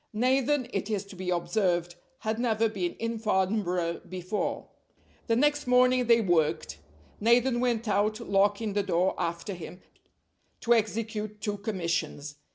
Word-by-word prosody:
Nathan, 260 +3 +2
it 195 +1 -2
is 205 -2 -1
to 200 - -12
be 185 0 -5
observed, 175 -1 0 0.3
had 220 0 -2
never 225 -2 +2
been 190 -5 -3
in 230 0 -3
Farnborough 190 -5 0
before. 185 +3 -3 0.6
The 230 - +2
next 290 +2 +2
morning 250 0 +4
they 235 -1 +5
worked. 160 - 0 0.4
Nathan 240 +3 +3
went 240 -2 0
out, 210 +2 +1
locking 205 0 +1
the 205 - +1
door 185 -1 +1
after 170 +3 -3
him, 175 0 -9 0.8
to 240 - +4
execute 215 -1 -2
two 205 -1 -3
commissions. 170 -8 -3
210 Hz, 140 wpm, -28 LUFS, 180-230 Hz, 0.8 s, they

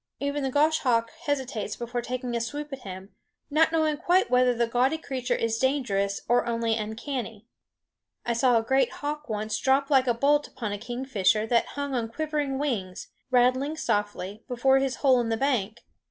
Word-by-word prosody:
Even 285 +1 -2
the 270 - -1
goshawk 260 -5 +2 0.2
hesitates 255 -7 -2
before 240 0 -4
taking 250 0 -4
a 235 - 0
swoop 290 +5 -5
at 270 - -5
him, 190 -2 -9 0.4
not 315 +2 +4
knowing 315 -2 +1
quite 355 -1 +2
whether 250 0 +4
the 240 -1 +1
gaudy 250 +6 +1
creature 265 -5 -2
is 230 0 -1
dangerous 220 -8 0
or 240 +1 +2
only 230 -1 0
uncanny. 225 0 -5 0.8
I 240 - 0
saw 245 0 +3
a 225 - +1
great 265 +2 +2
hawk 295 -1 -5
once 215 0 -2
drop 275 +2 +2
like 265 -2 +4
a 240 - +2
bolt 290 +4 +2
upon 215 -4 -5
a 205 - -4
kingfisher 230 -3 0
that 235 +1 +2
hung 285 -1 -2
on 235 -3 -1
quivering 295 0 -2
wings, 215 -11 -3 0.2
rattling 255 +4 +2
softly, 205 -4 -2
before 265 +1 +3
his 270 -1 -1
hole 260 -2 +6
in 230 - -2
the 225 - 0
bank. 235 -5 -1
250 Hz, 180 wpm, -26 LUFS, 225-275 Hz, 0.8 s, hole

